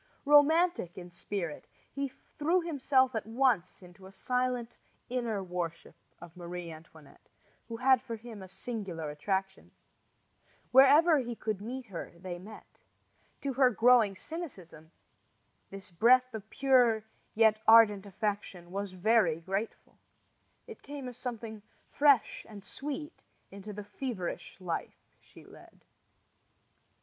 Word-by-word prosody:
Romantic 295 - +4
in 180 -1 -9
spirit, 175 -3 -5 0.2
he 280 0 -2
threw 310 +6 -1
himself 270 -5 +2
at 220 -2 -3
once 225 -7 0
into 180 +1 -14
a - - -14
silent 250 +1 -2 0.3
inner 235 -5 -2
worship 175 -2 -5 0.3
of 175 0 -13
Marie 175 -1 -7
Antoinette, 155 -2 -16 0.4
who 230 -1 -6
had 260 +1 +4
for 230 -3 -6
him 225 -2 -10
a 190 - -9
singular 185 -7 -5
attraction. 190 +5 -3 1.0
Wherever 290 +5 +7
he 240 -2 -4
could 215 -3 -3
meet 250 +4 -6
her 195 -6 -8
they 175 0 -7
met. 210 +4 -13 0.6
To 275 -1 -2
her 260 0 +5
growing 230 -3 +4
cynicism 190 - -8 0.8
this 195 -1 -9
breath 250 +7 +4
of 220 -1 -8
pure 250 -5 +3 0.3
yet 220 -1 +4
ardent 215 -3 +6
affection 200 -3 -4
was 200 0 -4
very 185 -4 +2
grateful. 195 +6 -5 0.7
It 455 -2 -11
came 280 -2 -7
as 245 - -10
something 225 -3 -6 0.3
fresh 285 -4 +3
and 205 -2 -11
sweet 295 +3 -6 0.3
into 200 +2 -9
the 210 0 -7
feverish 205 -5 -5
life 175 -3 -5
she - - -17
led. - - -17
220 Hz, 125 wpm, -30 LUFS, 185-255 Hz, 1.0 s, Wherever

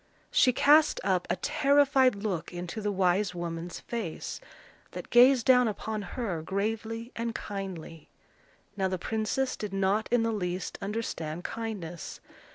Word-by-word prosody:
She 255 - +5
cast 295 +5 +5
up 185 -2 +1
a 175 - +2
terrified 275 +2 +3
look 200 -5 -3
into 175 +4 -5
the 210 0 -1
wise 190 0 +1
woman's 170 0 -5
face, 225 -9 -5 0.5
that - - -8
gazed 245 0 +6
down 250 -2 +6
upon 215 0 -3
her 195 -4 -4
gravely 225 +6 -3
and 230 -1 -3
kindly. 185 -6 -6 0.7
Now 190 -2 0
the 185 0 -2
princess 220 +7 -1
did 210 -2 -6
not 195 +3 +1
in 240 -1 +3
the 225 0 0
least 180 -3 -3
understand 190 -6 -4
kindness. 200 -8 -5
205 Hz, 140 wpm, -29 LUFS, 180-230 Hz, 0.7 s, gazed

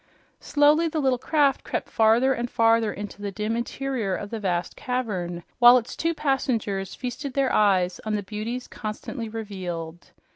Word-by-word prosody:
Slowly 295 +3 +3
the 315 -1 -2
little 260 -3 +2
craft 285 -1 +2
crept - - -3
farther 230 +4 +4
and 240 -1 -3
farther 225 -2 +3
into 205 0 -7
the 200 -1 -3
dim 215 +3 -2
interior 235 -4 -2
of 205 - -6
the 225 - -3
vast 180 -3 -2
cavern, 185 -9 -3 0.2
while 245 0 +9
its 235 -1 -4
two 330 0 -1
passengers 235 -10 -1
feasted 255 +2 -5
their 275 -2 +1
eyes 185 -4 +3
on 215 -1 -1
the 205 - -2
beauties 225 +5 -5
constantly 220 +2 -6
revealed. 180 -6 -6
225 Hz, 160 wpm, -25 LUFS, 205-260 Hz, 0.2 s, while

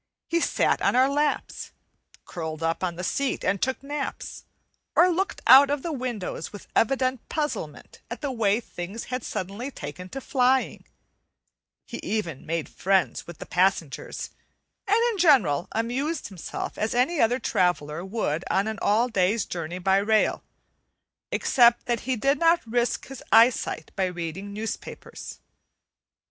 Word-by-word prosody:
He 335 - +1
sat - - +1
on - - +2
our 260 +1 +5
laps, 290 +1 -1 0.5
curled 160 -2 -5
up 165 +2 -1
on 175 -2 -1
the 180 - -6
seat 275 +8 -1
and 195 - +1
took 260 +1 -1
naps, 285 0 -5 0.5
or 360 - +6
looked 375 +3 -1
out 270 +2 +9
of 285 -1 -1
the 335 - -2
windows 245 -8 -4
with 205 - -10
evident 255 +1 +1
puzzlement 300 -2 -4
at - - -6
the 285 -3 -2
way 220 -3 +2
things 200 -1 -7
had 255 -2 -2
suddenly 200 +8 -4
taken 180 - -8
to 270 - -5
flying; 260 0 +1 1.0
he - - -7
even 175 -10 -3
made 165 -1 -2
friends 190 -1 0
with 170 -3 -9
the - - -8
passengers, 180 -5 -1 0.6
and 410 +2 +4
in 415 - -5
general 230 - +4
amused 260 +7 -2
himself 185 -5 -6
as 220 +2 -1
any 270 +6 +2
other 235 +2 +3
traveller 175 - 0
would 190 -5 -2
on 195 - +2
an 220 -2 -4
all 220 +4 +3
day's 210 0 +1
journey 170 0 -5
by 190 +1 +2
rail, 215 +2 +2 0.9
except 240 -2 +4
that 240 -2 0
he 260 - +2
did 275 +5 +1
not 335 -2 +3
risk 240 +1 0
his 270 -2 -9
eyesight 225 -8 +3
by 190 - +1
reading 180 +2 -5
newspapers. 215 +2 -7
225 Hz, 150 wpm, -25 LUFS, 180-265 Hz, 1.0 s, out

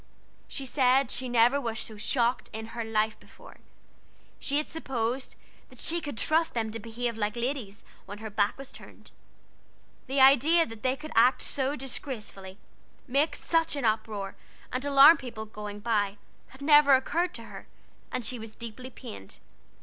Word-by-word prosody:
She 275 - -6
said 260 -1 +3
she 255 0 -3
never 245 +4 +4
was 230 -3 -3
so 220 - -5
shocked 235 +3 0
in 220 +1 -6
her 235 -1 -3
life 220 -1 0
before; - - -16 0.8
she 285 - -1
had 300 - 0
supposed 260 -4 -3 0.3
that - - -16
she 340 +1 0
could 290 -6 -6
trust 320 +3 +1
them 220 -2 -1
to 225 - -5
behave 230 +1 -4
like 210 0 -1
ladies 240 -4 -4 0.2
when 205 +1 -7
her 220 0 -7
back 205 0 +1
was 275 0 -9
turned. - - -14 1.0
The 270 +2 0
idea 280 +6 +6
that 225 -1 -10
they 260 0 +1
could 310 +3 -10
act 245 +3 +4
so 275 +1 -1
disgracefully, 225 -8 -6 0.5
make 290 +4 +1
such 330 -2 0
an 280 -4 -2
uproar 215 -3 -1 0.4
and 255 +1 -1
alarm 285 +3 +8
people 235 -5 -7
going 210 -1 -8
by, 205 -3 0 0.3
had 265 +2 -13
never 295 -2 +7
occurred 340 +7 0
to 230 - -8
her, - - -11 0.4
and 250 - -3
she 245 +2 -2
was 220 -1 -9
deeply 235 +3 -8
pained. 100 - -11
245 Hz, 165 wpm, -28 LUFS, 220-275 Hz, 1.0 s, alarm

